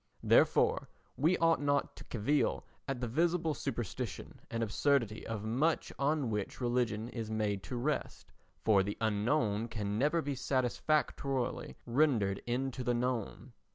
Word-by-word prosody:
Therefore -, -, +4 dB, 0.3 s
we 160 Hz, +6 st, +3 dB
ought 165 Hz, -2 st, +3 dB
not 145 Hz, -1 st, +1 dB
to -, -, -9 dB
cavil 125 Hz, +6 st, 0 dB, 0.2 s
at 135 Hz, -3 st, -3 dB
the 125 Hz, -, -1 dB
visible 165 Hz, +5 st, +1 dB
superstition 120 Hz, -5 st, -4 dB
and 115 Hz, 0 st, -1 dB
absurdity 115 Hz, 0 st, +1 dB
of 110 Hz, -2 st, -4 dB
much 135 Hz, +9 st, 0 dB
on 140 Hz, -3 st, +1 dB
which 105 Hz, -2 st, -3 dB
religion 120 Hz, -3 st, 0 dB
is 115 Hz, -3 st, -5 dB
made 105 Hz, -3 st, -1 dB
to 125 Hz, -, -5 dB
rest, 140 Hz, +5 st, -2 dB, 0.3 s
for 105 Hz, -3 st, +5 dB
the 100 Hz, +2 st, -3 dB
unknown 110 Hz, 0 st, +1 dB
can 105 Hz, -2 st, -3 dB
never 150 Hz, +5 st, +2 dB
be 145 Hz, -, -2 dB
satisfactorily 135 Hz, 0 st, 0 dB
rendered 120 Hz, -7 st, +2 dB
into 130 Hz, +1 st, -1 dB
the 120 Hz, 0 st, +1 dB
known. 120 Hz, -2 st, -2 dB
125 Hz, 140 wpm, -33 LUFS, 110-145 Hz, 0.3 s, for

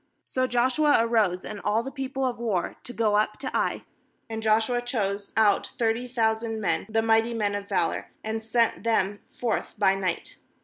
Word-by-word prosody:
3So 255 Hz, 0 st, -1 dB
Joshua 260 Hz, +5 st, +3 dB
arose, 220 Hz, -6 st, +2 dB
and 210 Hz, -2 st, -6 dB
all 215 Hz, +2 st, +1 dB
the 270 Hz, -, -6 dB
people 270 Hz, -1 st, -3 dB
of 245 Hz, -2 st, -2 dB
war, 210 Hz, -7 st, -1 dB
to -, -, -7 dB
go 220 Hz, -3 st, +1 dB
up 215 Hz, 0 st, +1 dB
to 265 Hz, -, -5 dB
Ai; -, -, 0 dB, 0.5 s
and 220 Hz, 0 st, -3 dB
Joshua 220 Hz, +3 st, +2 dB
chose 205 Hz, -5 st, -2 dB
out 210 Hz, -2 st, +4 dB
thirty 230 Hz, +1 st, 0 dB
thousand 225 Hz, -2 st, 0 dB
men, 210 Hz, -, 0 dB
the 225 Hz, 0 st, +1 dB
mighty 225 Hz, +1 st, +3 dB
men 205 Hz, -2 st, 0 dB
of 205 Hz, 0 st, -5 dB
valour, 180 Hz, -4 st, 0 dB, 0.2 s
and 220 Hz, +1 st, -3 dB
sent 230 Hz, +1 st, +1 dB
them 205 Hz, -3 st, +1 dB
forth 235 Hz, -3 st, -2 dB
by 195 Hz, -2 st, +4 dB
night. 185 Hz, -3 st, -3 dB
225 Hz, 180 wpm, -26 LUFS, 210-240 Hz, 0.5 s, out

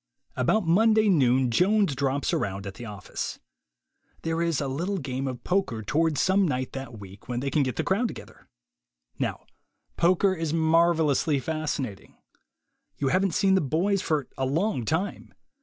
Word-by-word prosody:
About 175 Hz, -, +1 dB
Monday 215 Hz, +5 st, +4 dB
noon 130 Hz, -7 st, +3 dB
Jones 195 Hz, -, +3 dB
drops 135 Hz, +1 st, -1 dB
around 100 Hz, 0 st, -2 dB
at 100 Hz, -, -6 dB
the 120 Hz, -, -9 dB
office. 105 Hz, -2 st, -5 dB, 0.9 s
There 165 Hz, +1 st, -1 dB
is 170 Hz, -4 st, +1 dB
a 140 Hz, -, -2 dB
little 175 Hz, +9 st, -2 dB
game 135 Hz, -3 st, -3 dB
of 125 Hz, -2 st, -5 dB
poker 180 Hz, -, -1 dB
toward 155 Hz, +6 st, +1 dB
some 190 Hz, +3 st, +3 dB
night 130 Hz, -3 st, -2 dB
that 135 Hz, -4 st, -7 dB
week 100 Hz, 0 st, -12 dB
when 120 Hz, -1 st, -1 dB
they 135 Hz, +2 st, -2 dB
can 150 Hz, -, +2 dB
get 130 Hz, -4 st, -1 dB
the -, -, -1 dB
crowd 215 Hz, +6 st, +1 dB
together. -, -, -11 dB, 0.7 s
Now -, -, -3 dB, 0.5 s
poker 185 Hz, +3 st, +3 dB
is 165 Hz, -3 st, -3 dB
marvel 165 Hz, -1 st, +3 dB
ously 145 Hz, +2 st, +1 dB
fascinating. 145 Hz, -7 st, -4 dB, 0.8 s
You 135 Hz, -, 0 dB
haven't 185 Hz, 0 st, +1 dB
seen 195 Hz, -2 st, +3 dB
the 190 Hz, -, +4 dB
boys 180 Hz, +8 st, +1 dB
for 150 Hz, -6 st, -1 dB
a 135 Hz, -, +1 dB
long 160 Hz, -, 0 dB
time. 165 Hz, -, -3 dB
155 Hz, 165 wpm, -26 LUFS, 130-185 Hz, 0.9 s, Monday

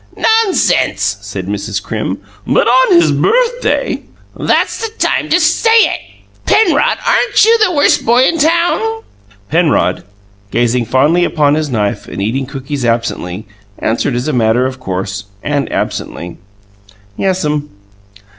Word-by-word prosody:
"Nonsense!" 185 Hz, -, +1 dB
said 100 Hz, -2 st, -6 dB
Mrs. 100 Hz, +1 st, -3 dB
Crim. 105 Hz, -2 st, -4 dB, 0.3 s
"But -, -, +2 dB
on 250 Hz, -7 st, +5 dB
his 160 Hz, -3 st, +3 dB
birthday!" 485 Hz, -, 0 dB, 0.3 s
"That's -, -, 0 dB
the 450 Hz, -, -3 dB
time -, -, 0 dB
to 350 Hz, -, +3 dB
say 340 Hz, +7 st, +2 dB
it. 455 Hz, -, +4 dB, 0.5 s
Penrod, 440 Hz, -, +3 dB
aren't -, -, +3 dB
you 455 Hz, +1 st, +5 dB
the 430 Hz, -4 st, +3 dB
Worst 290 Hz, -4 st, +2 dB
Boy 240 Hz, +3 st, +4 dB
in 330 Hz, +3 st, 0 dB
Town?" 345 Hz, +8 st, +1 dB, 0.5 s
Penrod, 165 Hz, -1 st, +1 dB, 0.5 s
gazing 120 Hz, +2 st, 0 dB
fondly 145 Hz, +9 st, +2 dB
upon 150 Hz, -4 st, +2 dB
his 155 Hz, -1 st, -1 dB
knife 105 Hz, -5 st, -2 dB
and -, -, -7 dB
eating 125 Hz, +7 st, -2 dB
cookies 135 Hz, 0 st, -5 dB
rapidly, 115 Hz, -5 st, -2 dB, 0.3 s
answered 120 Hz, +3 st, -1 dB
as 125 Hz, +4 st, -2 dB
a 155 Hz, -, -1 dB
matter 120 Hz, +1 st, +2 dB
of 130 Hz, 0 st, -4 dB
course, 95 Hz, -3 st, -4 dB, 0.2 s
and 145 Hz, -1 st, -2 dB
absently, 85 Hz, 0 st, -4 dB, 0.8 s
"Yes'm." 150 Hz, -, -1 dB
145 Hz, 135 wpm, -14 LUFS, -, 0.8 s, on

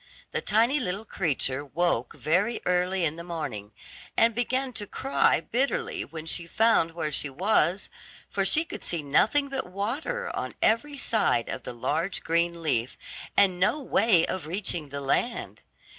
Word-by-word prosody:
The -, -, -1 dB
tiny 230 Hz, +7 st, +3 dB
little 205 Hz, -3 st, -2 dB
creature 145 Hz, -, -1 dB
woke 145 Hz, -4 st, 0 dB
very 200 Hz, +9 st, +1 dB
early 180 Hz, 0 st, +1 dB
in 160 Hz, +1 st, -1 dB
the 170 Hz, -, -6 dB
morning, 150 Hz, -12 st, -5 dB, 0.5 s
and 230 Hz, 0 st, +5 dB
began 255 Hz, +3 st, -1 dB
to 205 Hz, -2 st, -3 dB
cry 270 Hz, +7 st, +2 dB
bitterly 370 Hz, -, -1 dB
when 160 Hz, -, -8 dB
she 165 Hz, +1 st, -1 dB
found 190 Hz, -5 st, +2 dB
where 155 Hz, -3 st, -2 dB
she 145 Hz, 0 st, -1 dB
was, 185 Hz, +4 st, +1 dB, 0.4 s
for 195 Hz, -, -1 dB
she 310 Hz, +12 st, +2 dB
could -, -, -8 dB
see 170 Hz, -3 st, -1 dB
nothing 220 Hz, -, +3 dB
but 270 Hz, -5 st, -3 dB
water 265 Hz, -, -3 dB
on -, -, -4 dB
every 285 Hz, +6 st, +1 dB
side 220 Hz, -, +1 dB
of -, -, -4 dB
the 125 Hz, -, -6 dB
large 160 Hz, +10 st, -2 dB
green 170 Hz, 0 st, 0 dB
leaf, 125 Hz, -5 st, 0 dB, 0.4 s
and 185 Hz, -3 st, +4 dB
no 195 Hz, +11 st, +2 dB
way 225 Hz, -, +3 dB
of 185 Hz, -4 st, -4 dB
reaching 175 Hz, -4 st, -1 dB
the 140 Hz, +1 st, -5 dB
land. 185 Hz, -, -1 dB
180 Hz, 160 wpm, -27 LUFS, 160-235 Hz, 0.5 s, and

